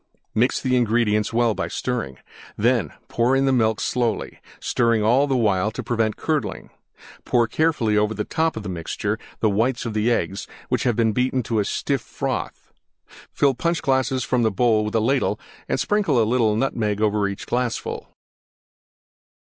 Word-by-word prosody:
Mix 120 Hz, +4 st, +2 dB
the 130 Hz, -1 st, 0 dB
ingredients 110 Hz, -3 st, +2 dB
well 115 Hz, -1 st, +2 dB
by -, -, -3 dB
stirring. 115 Hz, -, -3 dB, 0.4 s
Then -, -, +2 dB, 0.2 s
pour 120 Hz, +3 st, +2 dB
in 135 Hz, 0 st, +2 dB
the 135 Hz, -, +3 dB
milk 110 Hz, -3 st, +2 dB
slowly, 120 Hz, -4 st, -1 dB, 0.2 s
stirring 115 Hz, -3 st, +1 dB
all 125 Hz, +6 st, +4 dB
the 135 Hz, -2 st, +1 dB
while 105 Hz, -3 st, +2 dB
to 110 Hz, -, -6 dB
prevent 115 Hz, -3 st, 0 dB
curdling. 155 Hz, -8 st, -2 dB, 0.5 s
Pour 120 Hz, -1 st, +2 dB
carefully 120 Hz, -5 st, +1 dB
over 105 Hz, +1 st, 0 dB
the 105 Hz, -, -2 dB
top 160 Hz, +2 st, -1 dB
of 110 Hz, -, -5 dB
the -, -, -6 dB
mixture 85 Hz, -3 st, -3 dB, 0.2 s
the 110 Hz, -, +3 dB
whites 115 Hz, +5 st, 0 dB
of 115 Hz, -, -3 dB
the 110 Hz, +2 st, +1 dB
Eggs, 100 Hz, -4 st, -1 dB, 0.2 s
which -, -, 0 dB
have 120 Hz, -3 st, +2 dB
been 115 Hz, -1 st, +2 dB
beaten 130 Hz, +1 st, 0 dB
to 110 Hz, 0 st, -1 dB
a 100 Hz, -, +1 dB
stiff -, -, -1 dB
froth. -, -, -5 dB, 0.6 s
Fill 140 Hz, -2 st, +2 dB
Punch 170 Hz, +5 st, -1 dB
glasses 130 Hz, -1 st, +1 dB
from 125 Hz, -1 st, +1 dB
the 115 Hz, -, +3 dB
bowl 110 Hz, +1 st, +2 dB
with 105 Hz, -, -4 dB
ladle 125 Hz, +5 st, +1 dB, 0.3 s
and -, -, 0 dB
sprinkle 205 Hz, -, +2 dB
a 110 Hz, -, +4 dB
little 110 Hz, -2 st, +2 dB
Nutmeg 110 Hz, -4 st, 0 dB
over 105 Hz, -1 st, +2 dB
each 100 Hz, 0 st, -6 dB
glassful. 120 Hz, -1 st, -2 dB
115 Hz, 170 wpm, -23 LUFS, 105-125 Hz, 0.6 s, all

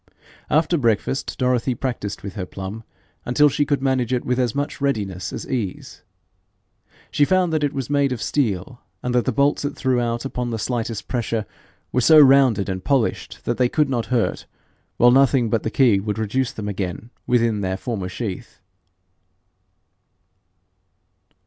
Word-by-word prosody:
After 160 Hz, +2 st, +2 dB
breakfast 115 Hz, +2 st, 0 dB
Dorothy 125 Hz, 0 st, +1 dB
practised 120 Hz, -7 st, -4 dB
with 100 Hz, -1 st, -6 dB
her 95 Hz, -4 st, -5 dB
plum 95 Hz, +5 st, -7 dB, 0.4 s
until 145 Hz, +4 st, +4 dB
she 145 Hz, +2 st, 0 dB
could 140 Hz, -2 st, 0 dB
manage 130 Hz, -3 st, +1 dB
it 125 Hz, -1 st, -1 dB
with 125 Hz, +1 st, 0 dB
as 120 Hz, -3 st, 0 dB
much 145 Hz, +1 st, -3 dB
readiness 100 Hz, -9 st, -2 dB
as -, -, -6 dB
ease. 110 Hz, -8 st, -4 dB, 1.1 s
She 145 Hz, -, +2 dB
found 180 Hz, +1 st, +2 dB
that 155 Hz, -1 st, +1 dB
it 145 Hz, -, +1 dB
was 135 Hz, -4 st, -4 dB
made 140 Hz, -1 st, +1 dB
of 125 Hz, -, -3 dB
steel, 120 Hz, -2 st, -2 dB, 0.2 s
and 125 Hz, -, -1 dB
that 125 Hz, -1 st, +2 dB
the 130 Hz, -, +1 dB
bolts 140 Hz, +5 st, +1 dB
it 145 Hz, 0 st, -3 dB
threw 130 Hz, -2 st, +1 dB
out 120 Hz, +1 st, -2 dB
upon 125 Hz, -2 st, -3 dB
the 115 Hz, -, -2 dB
slightest 115 Hz, -1 st, -3 dB
pressure 115 Hz, -3 st, -2 dB, 0.5 s
were 125 Hz, -, +1 dB
so 155 Hz, +6 st, +6 dB
rounded 135 Hz, -8 st, +6 dB
and 95 Hz, -1 st, -4 dB
polished 135 Hz, -5 st, -1 dB
that 120 Hz, -, -2 dB
they 125 Hz, -1 st, +3 dB
could 150 Hz, -1 st, +1 dB
not 120 Hz, -3 st, -1 dB
hurt, 120 Hz, -3 st, -1 dB, 0.5 s
while 120 Hz, 0 st, +6 dB
nothing 130 Hz, -3 st, +3 dB
but 115 Hz, -, +1 dB
the -, -, -2 dB
key 115 Hz, -5 st, +3 dB
would 105 Hz, +1 st, -3 dB
reduce 115 Hz, +4 st, -1 dB
them 105 Hz, -2 st, -6 dB
again 100 Hz, +2 st, -4 dB, 0.2 s
within 115 Hz, -4 st, +2 dB
their 95 Hz, -1 st, -2 dB
former 105 Hz, -6 st, -4 dB
sheath. 95 Hz, -1 st, -6 dB
120 Hz, 170 wpm, -22 LUFS, 110-135 Hz, 1.1 s, so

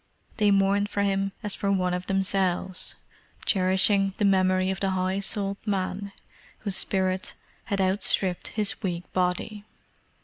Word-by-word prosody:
They 210 Hz, -2 st, +3 dB
mourned 200 Hz, +1 st, +3 dB
for 200 Hz, -, 0 dB
him 195 Hz, 0 st, 0 dB
as 210 Hz, -1 st, -1 dB
for 200 Hz, -, -1 dB
one 180 Hz, -2 st, +1 dB
of 180 Hz, 0 st, -3 dB
themselves, 190 Hz, -1 st, 0 dB, 0.5 s
cherishing 195 Hz, +1 st, +3 dB
the 210 Hz, -, +1 dB
memory 185 Hz, -1 st, +3 dB
of 190 Hz, -, -4 dB
the 195 Hz, -, 0 dB
high 185 Hz, +1 st, 0 dB
souled 200 Hz, 0 st, -1 dB
man 200 Hz, -1 st, -2 dB, 0.5 s
whose 200 Hz, -3 st, -1 dB
spirit 190 Hz, -1 st, 0 dB, 0.3 s
had 200 Hz, -, -2 dB
outstripped 190 Hz, -1 st, +1 dB
his 210 Hz, -2 st, -2 dB
weak 180 Hz, -3 st, -4 dB
body. 185 Hz, +3 st, -1 dB
195 Hz, 140 wpm, -26 LUFS, 185-200 Hz, 0.5 s, They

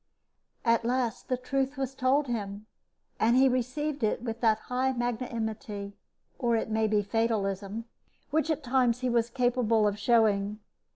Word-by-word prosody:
At 230 Hz, 0 st, +3 dB
last 240 Hz, -2 st, -1 dB
the 255 Hz, -, +1 dB
truth 270 Hz, +2 st, -2 dB
was 270 Hz, -1 st, -2 dB
told 270 Hz, +3 st, +2 dB
him, 210 Hz, -4 st, -4 dB, 0.5 s
and 230 Hz, +2 st, +4 dB
he 265 Hz, +1 st, +6 dB
received 260 Hz, +3 st, -1 dB
it 215 Hz, +2 st, 0 dB
with 230 Hz, -1 st, -4 dB
that 220 Hz, -2 st, +4 dB
high 260 Hz, +1 st, 0 dB
magnanimity, 220 Hz, -4 st, -3 dB, 0.5 s
or 235 Hz, -3 st, +2 dB
it 220 Hz, 0 st, -1 dB
may 220 Hz, 0 st, +2 dB
be 210 Hz, -1 st, +2 dB
fatalism, 205 Hz, -1 st, -1 dB, 0.5 s
which 315 Hz, +1 st, +1 dB
at 310 Hz, -1 st, -1 dB
times 250 Hz, -1 st, +2 dB
he 255 Hz, -, 0 dB
was 235 Hz, 0 st, +2 dB
capable 235 Hz, -3 st, +2 dB
of 205 Hz, 0 st, -2 dB
showing. 210 Hz, -3 st, +2 dB
235 Hz, 155 wpm, -29 LUFS, 220-255 Hz, 0.5 s, he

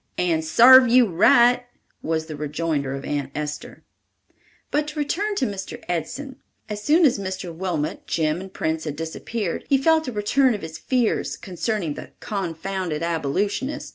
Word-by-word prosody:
"And 170 Hz, -3 st, +1 dB
sarved 250 Hz, +9 st, +7 dB
you 245 Hz, +1 st, +6 dB
right," 240 Hz, +7 st, +4 dB, 0.4 s
was 160 Hz, -1 st, -1 dB
the 155 Hz, -1 st, -7 dB
rejoinder 150 Hz, -2 st, -2 dB
of 135 Hz, -, -7 dB
Aunt 145 Hz, -2 st, -2 dB
Esther. 150 Hz, 0 st, -6 dB, 0.9 s
But 295 Hz, +1 st, 0 dB
to 300 Hz, +1 st, -7 dB
return 400 Hz, +8 st, -1 dB
to 270 Hz, -, +1 dB
Mr. 195 Hz, -3 st, -5 dB
Edson. 245 Hz, -, -4 dB, 0.3 s
As 210 Hz, -1 st, -5 dB
soon 320 Hz, +6 st, +4 dB
as 250 Hz, -7 st, +3 dB
Mr. 185 Hz, -2 st, -5 dB
Wilmot, 165 Hz, -3 st, -3 dB
Jim 160 Hz, +1 st, 0 dB
and 190 Hz, 0 st, -9 dB
Prince 160 Hz, -2 st, -2 dB
had 150 Hz, -2 st, -4 dB
disappeared, 165 Hz, +5 st, -4 dB
he 275 Hz, -, +5 dB
felt 315 Hz, +2 st, +2 dB
a -, -, -2 dB
return 235 Hz, +4 st, +2 dB
of 205 Hz, -, -8 dB
his 160 Hz, 0 st, -7 dB
fears 250 Hz, -4 st, 0 dB
concerning 185 Hz, -2 st, -3 dB
the -, -, -10 dB
"confounded 185 Hz, -3 st, -3 dB
Abolitionist." 170 Hz, -, -2 dB
190 Hz, 160 wpm, -23 LUFS, 160-245 Hz, 0.9 s, sarved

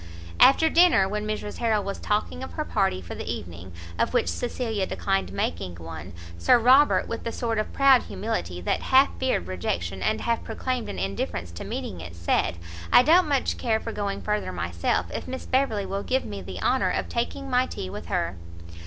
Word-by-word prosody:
After 320 Hz, +4 st, +7 dB
dinner, 335 Hz, -, +5 dB
when 210 Hz, +2 st, -3 dB
Mrs 210 Hz, -1 st, -4 dB
Harrel 220 Hz, -3 st, +1 dB
was 195 Hz, 0 st, -4 dB
talking 210 Hz, -, -1 dB
of -, -, -8 dB
her -, -, -3 dB
party 90 Hz, 0 st, 0 dB
for 85 Hz, -, -7 dB
the -, -, -5 dB
evening, 85 Hz, +1 st, -7 dB, 0.3 s
of -, -, +1 dB
which 85 Hz, -, +2 dB
Cecilia 200 Hz, -, -2 dB
declined 90 Hz, +1 st, -1 dB
making 85 Hz, -1 st, -3 dB
one, 80 Hz, +1 st, -8 dB, 0.3 s
Sir 85 Hz, -, +5 dB
Robert, 260 Hz, +5 st, +5 dB
with 230 Hz, -, -5 dB
a -, -, -1 dB
sort 230 Hz, -1 st, -1 dB
of 215 Hz, -, -3 dB
proud 275 Hz, -2 st, +5 dB
humility, 90 Hz, -, -4 dB
that -, -, 0 dB
half 265 Hz, +2 st, +5 dB
feared 260 Hz, -, 0 dB
rejection, 90 Hz, 0 st, -3 dB
and -, -, 0 dB
half 230 Hz, -1 st, 0 dB
proclaimed 250 Hz, +2 st, -3 dB
an -, -, -5 dB
indifference 90 Hz, -2 st, -3 dB
to 85 Hz, -, -7 dB
meeting 90 Hz, -, -5 dB
it, 85 Hz, +1 st, -9 dB
said, 85 Hz, 0 st, 0 dB, 0.3 s
"I 245 Hz, -, +8 dB
don't 330 Hz, +4 st, +5 dB
much 275 Hz, -2 st, 0 dB
care 220 Hz, -2 st, +1 dB
for 225 Hz, -, -5 dB
going 200 Hz, -2 st, -3 dB
further 210 Hz, -, -1 dB
myself, 85 Hz, -1 st, -1 dB
if -, -, -5 dB
Miss 260 Hz, 0 st, -6 dB
Beverley 255 Hz, -7 st, +1 dB
will 195 Hz, +1 st, -3 dB
give 260 Hz, +5 st, 0 dB
me 100 Hz, -1 st, -6 dB
the 90 Hz, -1 st, -7 dB
honour -, -, +2 dB
of -, -, -1 dB
taking 245 Hz, +4 st, -3 dB
my 255 Hz, 0 st, +2 dB
tea 95 Hz, -, -6 dB
with -, -, -7 dB
her." 85 Hz, +1 st, -1 dB
200 Hz, 195 wpm, -25 LUFS, -, 0.3 s, I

